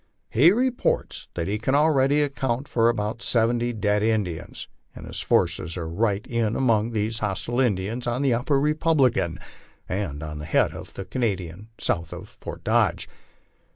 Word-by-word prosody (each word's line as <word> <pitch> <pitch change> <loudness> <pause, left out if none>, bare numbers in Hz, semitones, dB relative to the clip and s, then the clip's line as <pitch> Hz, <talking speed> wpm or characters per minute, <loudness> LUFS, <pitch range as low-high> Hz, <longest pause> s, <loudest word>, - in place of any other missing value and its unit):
He 145 +10 +6
reports 250 +3 0
that 85 -1 -2
he 105 +2 -1
can 130 +5 +1
already 145 -1 +4
account 135 -2 -2
for 115 -1 +3
about 110 0 -2
seventy 120 0 +1
dead 105 -2 0
Indians, 105 -7 -2 0.3
and - - -9
his - - -5
forces 80 +3 +1
are 85 -2 -4
right 100 +4 0
in 115 -2 -1
among 115 -4 +2
these 110 0 -1
hostile 105 +4 -2
Indians 115 0 0
on 120 +3 0
the 135 -3 +3
Upper 130 +4 +1
Republican, 140 - +2 0.5
and 90 -7 -3
on 75 -1 -6
the 75 - -6
head 80 - +2
of - - -10
the 95 - -6
Canadian 100 -5 -3
south 85 -1 -1
of - - -9
Fort - - -9
Dodge." - - +2
115 Hz, 160 wpm, -24 LUFS, 100-130 Hz, 0.5 s, He